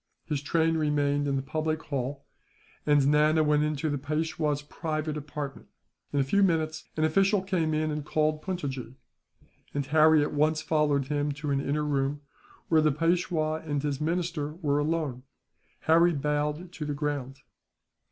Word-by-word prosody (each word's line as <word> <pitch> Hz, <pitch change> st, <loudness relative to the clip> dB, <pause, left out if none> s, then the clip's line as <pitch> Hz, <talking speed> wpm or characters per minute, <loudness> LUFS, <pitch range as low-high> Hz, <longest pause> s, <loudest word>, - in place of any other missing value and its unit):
His 150 Hz, -3 st, -2 dB
train 165 Hz, +2 st, +1 dB
remained 145 Hz, -2 st, +1 dB
in 140 Hz, -, 0 dB
the 135 Hz, -, -1 dB
public 155 Hz, +2 st, -2 dB
hall, 140 Hz, 0 st, -4 dB, 0.6 s
and 145 Hz, -2 st, +4 dB
Nana 150 Hz, +2 st, +4 dB
went 150 Hz, 0 st, +3 dB
into 150 Hz, 0 st, -1 dB
the 145 Hz, -2 st, -1 dB
Peishwa's 150 Hz, 0 st, -1 dB
private 155 Hz, 0 st, -3 dB
apartment. 145 Hz, -1 st, -6 dB, 0.4 s
In 145 Hz, -, 0 dB
a -, -, +4 dB
few 200 Hz, +10 st, +2 dB
minutes, 160 Hz, -4 st, +1 dB
an 155 Hz, -, +1 dB
official 195 Hz, +5 st, +3 dB
came 180 Hz, -5 st, 0 dB
in 155 Hz, 0 st, 0 dB
and 150 Hz, 0 st, -3 dB
called 155 Hz, +1 st, 0 dB
Puntojee; 135 Hz, -9 st, -4 dB, 0.8 s
and 140 Hz, -1 st, -1 dB
Harry 155 Hz, +1 st, +5 dB
at 145 Hz, -, -3 dB
once 155 Hz, +1 st, +2 dB
followed 150 Hz, -3 st, +1 dB
him 145 Hz, 0 st, 0 dB
to 150 Hz, 0 st, -4 dB
an 140 Hz, 0 st, +1 dB
inner 150 Hz, +2 st, -1 dB
room, 140 Hz, 0 st, 0 dB, 0.5 s
where 160 Hz, -1 st, +4 dB
the 155 Hz, 0 st, +3 dB
Peishwa 165 Hz, 0 st, 0 dB
and 145 Hz, -3 st, -2 dB
his 145 Hz, -1 st, -2 dB
minister 165 Hz, -2 st, -1 dB
were 145 Hz, -4 st, 0 dB
alone. 150 Hz, -4 st, -1 dB, 0.6 s
Harry 170 Hz, +2 st, +4 dB
bowed 150 Hz, +3 st, -1 dB
to 170 Hz, -4 st, -6 dB
the 150 Hz, -1 st, -3 dB
ground. 140 Hz, -2 st, -3 dB
150 Hz, 160 wpm, -28 LUFS, 145-160 Hz, 0.8 s, Harry